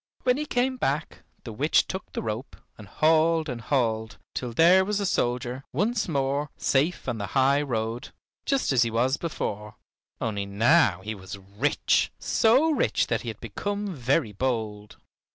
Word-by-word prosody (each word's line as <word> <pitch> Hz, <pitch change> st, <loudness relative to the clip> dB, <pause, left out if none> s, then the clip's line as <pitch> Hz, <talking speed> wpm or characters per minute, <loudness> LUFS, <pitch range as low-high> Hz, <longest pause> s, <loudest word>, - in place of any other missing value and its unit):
When 250 Hz, 0 st, +3 dB
he 300 Hz, +1 st, -3 dB
came 255 Hz, 0 st, 0 dB
back 150 Hz, -, -2 dB, 0.2 s
the 115 Hz, -, -7 dB
witch 145 Hz, +9 st, +2 dB
took 190 Hz, 0 st, -6 dB
the -, -, -4 dB
rope 110 Hz, +4 st, -5 dB, 0.2 s
and 105 Hz, -, -12 dB
hauled 160 Hz, -, +2 dB
and 125 Hz, -4 st, -5 dB
hauled, 115 Hz, -4 st, -1 dB, 0.2 s
till 125 Hz, -2 st, -4 dB
there 175 Hz, +9 st, +5 dB
was 205 Hz, +1 st, -1 dB
the 205 Hz, -, -1 dB
soldier, 125 Hz, -4 st, -1 dB
once 215 Hz, +1 st, 0 dB
more, 140 Hz, -1 st, -1 dB
safe 150 Hz, +6 st, 0 dB
on 115 Hz, -, -2 dB
the 100 Hz, -, -3 dB
high 135 Hz, +2 st, +4 dB
road, 120 Hz, -1 st, -3 dB, 0.3 s
just 275 Hz, -, 0 dB
as 125 Hz, -, +4 dB
he 115 Hz, -, +3 dB
was 125 Hz, +5 st, +1 dB
before, 105 Hz, -10 st, -4 dB, 0.4 s
only 100 Hz, -3 st, -2 dB
now 105 Hz, -, +3 dB
he 110 Hz, +3 st, -4 dB
was 95 Hz, -1 st, -9 dB
rich, 100 Hz, +9 st, 0 dB
so 255 Hz, +8 st, +3 dB
rich 300 Hz, -, +1 dB
that -, -, 0 dB
he -, -, -9 dB
had -, -, -5 dB
become 205 Hz, -1 st, -4 dB
very 130 Hz, -3 st, 0 dB
bold. 105 Hz, -2 st, -3 dB
135 Hz, 170 wpm, -26 LUFS, 110-165 Hz, 0.4 s, there